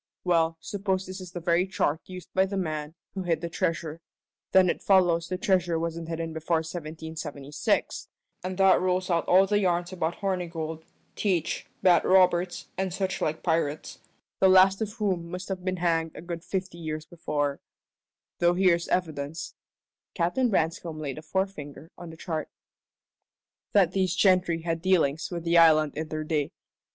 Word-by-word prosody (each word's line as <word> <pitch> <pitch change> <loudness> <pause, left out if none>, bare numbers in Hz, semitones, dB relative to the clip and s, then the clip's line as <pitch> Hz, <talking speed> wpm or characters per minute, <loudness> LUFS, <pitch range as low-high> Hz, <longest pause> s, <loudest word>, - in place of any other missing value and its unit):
We'll 165 -2 +2
suppose 190 -2 -2
this 185 +1 -7
is 180 -1 -9
the 175 - -4
very 170 +2 +2
chart 160 -5 0
used 185 -1 -10
by 190 +1 +3
the 195 +1 -4
man 155 -3 -3 0.2
who 195 - -4
hid 165 -3 0
the 170 - -3
treasure. 165 -1 -2 0.5
Then 190 -1 +6
it - - -1
follows 175 -4 +3
the 185 - -3
treasure 180 -3 +1
wasn't 165 0 -3
hidden 165 -1 -3
before 160 +1 0
1776, 155 -3 -3 0.4
and 185 0 -4
that 195 -1 +5
rules 185 0 0
out 170 -1 +1
all 190 +2 +6
the 205 +1 +2
yarns 175 -1 0
about 170 -2 -1
Hornigold, 165 -5 -3 0.3
Teach, 175 -6 -1 0.2
Bat 175 -3 +5
Roberts, 180 -1 +3
and 190 -1 -1
suchlike 185 -4 -2
pirates, 160 -3 -1 0.4
the 190 - +6
last 190 +2 +6
of 210 -1 -2
whom 190 -7 -2
must 180 +2 -6
have 185 -2 -4
been 185 0 -1
hanged 165 -2 0
a - - -8
good 170 -1 -6
fifty 185 -3 -4
years 155 -1 -4
before: 145 -4 -2 0.8
though 175 0 +3
here's 175 -2 +3
evidence" 155 -3 -2 0.6
Captain 200 +9 +1
Branscome 165 -3 -1
laid 145 -1 -4
a - - -9
forefinger 160 -3 -4
on 175 - -9
the 160 - -11
chart 160 -2 -4 1.2
"that 190 -4 +5
these 185 -2 0
gentry 180 -4 +3
had 165 -1 -2
dealings 165 -5 +2
with 170 -2 -5
the 170 0 +4
island 155 -2 +5
in 155 +1 -3
their 155 0 -4
day. 155 -2 -1
170 Hz, 165 wpm, -27 LUFS, 160-185 Hz, 1.2 s, Then